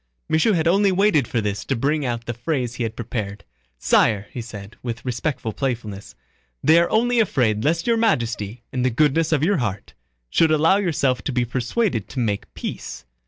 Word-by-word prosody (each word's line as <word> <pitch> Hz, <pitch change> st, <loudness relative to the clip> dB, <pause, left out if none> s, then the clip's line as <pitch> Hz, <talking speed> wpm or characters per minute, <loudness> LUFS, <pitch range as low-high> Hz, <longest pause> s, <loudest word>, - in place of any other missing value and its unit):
Michaud 160 Hz, +8 st, +3 dB
had 165 Hz, -1 st, +1 dB
only 195 Hz, +3 st, +4 dB
waited 185 Hz, -, +3 dB
for 115 Hz, -, -1 dB
this 105 Hz, -1 st, -2 dB
to 135 Hz, -, -1 dB
bring 145 Hz, +5 st, 0 dB
out 120 Hz, -1 st, -3 dB
the 120 Hz, -, -3 dB
phrase 125 Hz, 0 st, -2 dB
he 125 Hz, -, -7 dB
had 115 Hz, -1 st, -2 dB
prepared. 105 Hz, -3 st, -5 dB, 0.3 s
"Sire," 100 Hz, -, +3 dB
he 125 Hz, -, -5 dB
said, 105 Hz, -2 st, -9 dB
with 120 Hz, 0 st, -5 dB
respectful 125 Hz, -2 st, -2 dB
playfulness, 110 Hz, -, -4 dB, 0.5 s
"they 160 Hz, +2 st, +6 dB
are 170 Hz, -, +2 dB
only 240 Hz, +2 st, +2 dB
afraid 115 Hz, -, +1 dB
lest 165 Hz, +3 st, +1 dB
Your 235 Hz, -1 st, +2 dB
Majesty, 120 Hz, -, 0 dB
in 130 Hz, -, -2 dB
the 130 Hz, -, +2 dB
goodness 150 Hz, +6 st, +2 dB
of 150 Hz, -2 st, +2 dB
your 195 Hz, +3 st, +3 dB
heart, 105 Hz, -6 st, -3 dB, 0.4 s
should 165 Hz, -, +4 dB
allow 160 Hz, +5 st, +4 dB
yourself 145 Hz, -10 st, 0 dB
to -, -, -1 dB
be 125 Hz, -1 st, +1 dB
persuaded 125 Hz, -, -1 dB
to -, -, -5 dB
make 105 Hz, -4 st, -2 dB
peace. -, -, -6 dB
125 Hz, 190 wpm, -22 LUFS, 115-165 Hz, 0.5 s, they